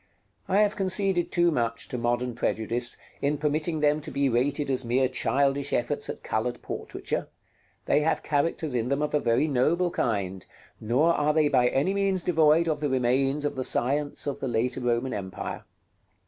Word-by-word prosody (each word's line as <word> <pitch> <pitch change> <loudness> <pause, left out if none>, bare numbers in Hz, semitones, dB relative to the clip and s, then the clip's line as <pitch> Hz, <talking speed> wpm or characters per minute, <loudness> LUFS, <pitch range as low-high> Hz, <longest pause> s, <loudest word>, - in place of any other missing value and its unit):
I 195 +3 +3
have 210 -1 +2
conceded 190 -2 +1
too 175 -1 +3
much 115 -5 -1
to 125 - -4
modern 120 +1 -1
prejudice, 115 +2 0 0.2
in 145 +1 0
permitting 155 +2 -1
them 150 0 +2
to - - -7
be 140 -1 0
rated 135 +4 0
as 130 0 0
mere 125 +2 +2
childish 135 +3 0
efforts 120 - -1
at - - -6
colored 120 +3 -2
portraiture: - - -4 0.6
they - - +3
have 150 +2 0
characters 150 0 -1
in 120 0 -1
them 140 +2 0
of 150 - -2
a 150 - +3
very 120 +4 +1
noble 165 +6 +1
kind; 95 - -2 0.4
nor 135 +10 +2
are 150 -1 +1
they 155 -2 +3
by 125 -3 +3
any 145 +10 +1
means 195 -2 +1
devoid 160 -1 +3
of 155 -2 0
the 145 -1 -1
remains 135 +3 +1
of 145 - -2
the 130 - -2
science 145 +4 0
of 140 -2 -3
the 135 - -3
later 120 +2 -1
Roman 120 +1 0
empire. 95 -2 -6
140 Hz, 180 wpm, -26 LUFS, 125-155 Hz, 0.6 s, I